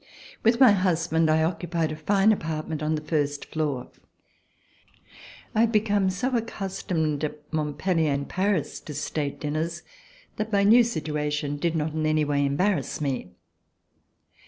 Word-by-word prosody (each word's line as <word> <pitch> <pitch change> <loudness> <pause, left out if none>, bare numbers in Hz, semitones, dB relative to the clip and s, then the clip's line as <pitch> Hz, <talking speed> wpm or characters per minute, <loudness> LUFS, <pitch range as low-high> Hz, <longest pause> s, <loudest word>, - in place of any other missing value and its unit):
With 230 +2 +3
my 255 -5 +8
husband 170 -4 +2
I 160 0 +3
occupied 165 -1 -1
a - - -4
fine 195 +7 +3
apartment 155 -5 -3
on 155 +1 0
the 155 - -4
first 145 -2 -1
floor. 145 -5 -3 1.6
I - - 0
had 230 0 +4
become 205 -3 +2
so 245 +8 -1
accustomed 185 -9 -2
at 150 0 -5
Montj)ellier 155 +1 0
and 140 0 -2
Paris 185 -5 -1
to 150 - -9
state 145 0 -3
dinners 160 +3 -2 0.5
that 215 +1 -3
my 200 -1 +3
new 230 +4 +7
situation 150 -7 -2
did 165 +2 -1
not 155 -1 -1
in 155 0 0
any 155 0 +2
way 145 -1 +1
embarrass 145 +3 0
me. 130 -11 -3
160 Hz, 145 wpm, -26 LUFS, 150-195 Hz, 1.6 s, my